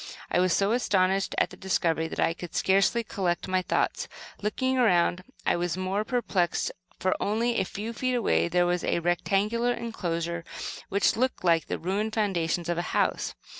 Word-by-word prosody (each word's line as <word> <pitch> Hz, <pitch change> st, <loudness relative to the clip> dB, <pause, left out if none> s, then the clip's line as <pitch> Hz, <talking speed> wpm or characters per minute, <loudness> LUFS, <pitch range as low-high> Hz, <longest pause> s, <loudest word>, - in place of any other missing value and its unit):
I -, -, +3 dB
was 185 Hz, 0 st, +3 dB
so 200 Hz, +4 st, +2 dB
astonished 195 Hz, -5 st, +1 dB
at -, -, +2 dB
the -, -, -9 dB
discovery 165 Hz, -4 st, 0 dB
that -, -, -7 dB
I 165 Hz, -, +3 dB
could 175 Hz, 0 st, -9 dB
scarcely 195 Hz, +5 st, +3 dB
collect 185 Hz, -5 st, -2 dB
my 185 Hz, 0 st, +1 dB
thoughts. -, -, 0 dB, 0.3 s
Looking 260 Hz, +5 st, 0 dB
around, 180 Hz, -5 st, +3 dB, 0.2 s
I -, -, +3 dB
was 175 Hz, 0 st, -1 dB
still 185 Hz, -, -3 dB
more 195 Hz, +3 st, 0 dB
perplexed, 215 Hz, -8 st, 0 dB, 0.3 s
for 185 Hz, -, +1 dB
only 230 Hz, +3 st, +1 dB
a -, -, +2 dB
few 215 Hz, +5 st, -5 dB
feet 255 Hz, +2 st, -1 dB
away 235 Hz, -7 st, +2 dB
there 175 Hz, +1 st, +2 dB
was 175 Hz, 0 st, 0 dB
a -, -, +1 dB
rectangular 200 Hz, +7 st, +1 dB
enclosure 170 Hz, -8 st, -3 dB, 0.5 s
which 200 Hz, +1 st, +2 dB
looked 255 Hz, -2 st, 0 dB
like 165 Hz, -2 st, +3 dB
the -, -, -2 dB
ruined 205 Hz, +5 st, -2 dB
foundations 175 Hz, -5 st, 0 dB
of 175 Hz, 0 st, 0 dB
a 175 Hz, -, -4 dB
house. -, -, 0 dB
190 Hz, 180 wpm, -27 LUFS, 175-220 Hz, 0.5 s, I